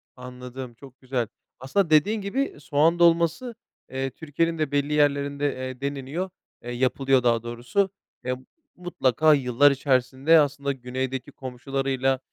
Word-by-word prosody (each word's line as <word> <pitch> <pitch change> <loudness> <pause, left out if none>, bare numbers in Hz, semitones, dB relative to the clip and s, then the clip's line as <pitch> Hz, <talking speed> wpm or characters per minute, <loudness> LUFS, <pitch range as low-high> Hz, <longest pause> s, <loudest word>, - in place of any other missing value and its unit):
Anladım, 125 0 -8
çok 130 +2 -16
güzel. 125 -3 -2 0.3
Aslında 160 +7 0
dediğin 200 +8 +3
gibi 260 +8 -2
soğan 155 +4 +2
dolması, 170 +8 +3 0.3
eee, 135 +1 -2
Türkiye'nin 165 +3 -2
de 155 -3 -1
belli 145 +1 0
yerlerinde, 145 -1 +1
eee, 130 0 -6
deneniyor, 140 +6 -3 0.3
eee, 120 - -5
yapılıyor 130 +1 +2
daha 115 -1 +2
doğrusu. 125 - -1 0.4
Eee, 125 0 0 0.4
mutlaka 155 -4 +2
yıllar 140 +1 +4
içerisinde, 135 +3 +3
aslında 140 -1 0
güneydeki 130 +1 -4
komşularıyla 135 0 -2
135 Hz, 125 wpm, -25 LUFS, 130-155 Hz, 0.4 s, yıllar